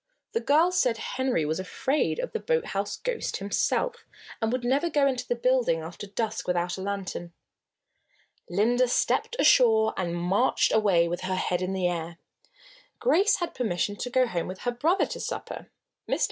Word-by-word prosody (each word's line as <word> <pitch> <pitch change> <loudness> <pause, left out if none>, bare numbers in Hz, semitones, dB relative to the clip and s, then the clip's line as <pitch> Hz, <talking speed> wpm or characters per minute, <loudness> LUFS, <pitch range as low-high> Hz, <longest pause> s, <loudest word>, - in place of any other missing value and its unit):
The 455 - 0
girls 340 +5 +3
said 240 -7 +2
Henry 255 - -1
was 155 +4 -1
afraid 265 +10 -1
of - - -3
the 450 - -2
boathouse 205 - -1
ghost - - -3
himself, 330 - 0 0.4
and 225 0 +1
would 250 0 -2
never 275 +7 +1
go 290 -3 +2
into 260 -2 -1
the 240 - 0
building 240 -9 +1
after 170 +5 -8
dusk 215 +2 -3
without 175 0 0
a 190 - -7
lantern. 190 -3 -4 1.2
Linda 235 +8 +2
stepped 250 - +1
ashore 220 - +5
and 175 -2 -2
marched 190 +8 +2
away 195 -6 +3
with 175 +1 -3
her 185 0 -2
head 180 -1 -1
in 185 +1 -2
the 185 -2 +1
air. 170 -1 -4 0.8
Grace 425 0 +4
had 345 -2 -3
permission 205 -4 -1
to 245 - -4
go 255 +1 +3
home 175 -8 -3
with 185 +1 -7
her 245 - -1
brother 315 +11 +2
to - - -6
supper. - - -6 0.4
Mr. - - 0
220 Hz, 175 wpm, -27 LUFS, 185-265 Hz, 1.2 s, ashore